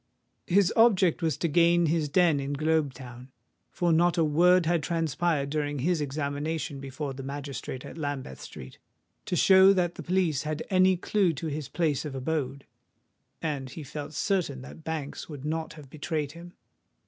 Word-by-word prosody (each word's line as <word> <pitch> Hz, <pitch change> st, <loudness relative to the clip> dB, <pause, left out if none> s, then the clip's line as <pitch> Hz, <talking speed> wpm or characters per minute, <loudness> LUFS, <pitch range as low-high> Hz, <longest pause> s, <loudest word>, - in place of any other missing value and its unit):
His 190 Hz, +1 st, +3 dB
object 195 Hz, -7 st, +4 dB
was 160 Hz, -2 st, 0 dB
to 170 Hz, -, 0 dB
gain 170 Hz, +2 st, +4 dB
his 155 Hz, -1 st, 0 dB
den 165 Hz, -1 st, +3 dB
in 140 Hz, +1 st, -3 dB
Globe 155 Hz, 0 st, +1 dB
Town; 125 Hz, 0 st, -11 dB, 0.4 s
for 175 Hz, -2 st, +1 dB
not 175 Hz, +2 st, +3 dB
a 165 Hz, -, +4 dB
word 175 Hz, +4 st, +4 dB
had 170 Hz, 0 st, +2 dB
transpired 160 Hz, -2 st, -1 dB
during 145 Hz, -1 st, -1 dB
his 160 Hz, +4 st, 0 dB
examination 145 Hz, +1 st, -3 dB
before 135 Hz, +1 st, -5 dB
the 135 Hz, -, -7 dB
magistrate 135 Hz, -2 st, -6 dB
at -, -, -9 dB
Lambeth 140 Hz, -, -4 dB
Street, 65 Hz, 0 st, -10 dB, 0.5 s
to -, -, -2 dB
show 190 Hz, +2 st, +7 dB
that 175 Hz, -2 st, 0 dB
the -, -, -8 dB
police 175 Hz, -6 st, +1 dB
had 155 Hz, 0 st, -3 dB
any 185 Hz, 0 st, +4 dB
clue 185 Hz, -1 st, +1 dB
to 155 Hz, +2 st, -6 dB
his 150 Hz, -2 st, -5 dB
place 155 Hz, -5 st, 0 dB
of 150 Hz, -3 st, -6 dB
abode; 135 Hz, 0 st, -3 dB, 0.8 s
and 140 Hz, -5 st, -2 dB
he 155 Hz, +4 st, -8 dB
felt 145 Hz, +2 st, -7 dB
certain 155 Hz, -7 st, -1 dB
that 155 Hz, +4 st, -12 dB
Banks 155 Hz, -2 st, -5 dB
would 145 Hz, -2 st, -8 dB
not 160 Hz, +1 st, -3 dB
have 150 Hz, -3 st, -12 dB
betrayed 150 Hz, 0 st, -3 dB
him. 170 Hz, +2 st, -12 dB
155 Hz, 170 wpm, -28 LUFS, 140-170 Hz, 0.8 s, show